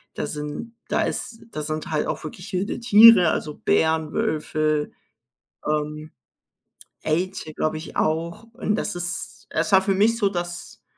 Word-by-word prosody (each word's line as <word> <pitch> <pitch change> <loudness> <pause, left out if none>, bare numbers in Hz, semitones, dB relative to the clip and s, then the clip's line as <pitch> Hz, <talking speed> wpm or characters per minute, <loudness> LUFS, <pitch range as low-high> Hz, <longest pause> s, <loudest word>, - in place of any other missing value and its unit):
da - - -3
sind 150 +10 -6 0.2
da - - +1
ist 225 - -4
da 155 - -4
sind 155 +1 -4
halt 155 -1 0
auch - - -3
wirklich 180 +6 -8
wilde 190 +4 -1
Tiere, 225 -7 +8
also 150 -1 -3
Bären, 160 -1 +1
Wölfe, 155 -1 0 0.8
ähm, 150 0 -2 0.9
Elche, 170 0 -2
glaube 155 +1 -1
ich, 155 - -10
auch 165 +5 -1
und 225 -3 -1
das 210 -3 -3
ist 175 -1 -5
es 165 +5 -1
war 190 - +8
für 195 0 +1
mich 215 +4 +3
so 205 -3 +3
das, 175 -2 -6
170 Hz, 155 wpm, -23 LUFS, 155-195 Hz, 0.9 s, Tiere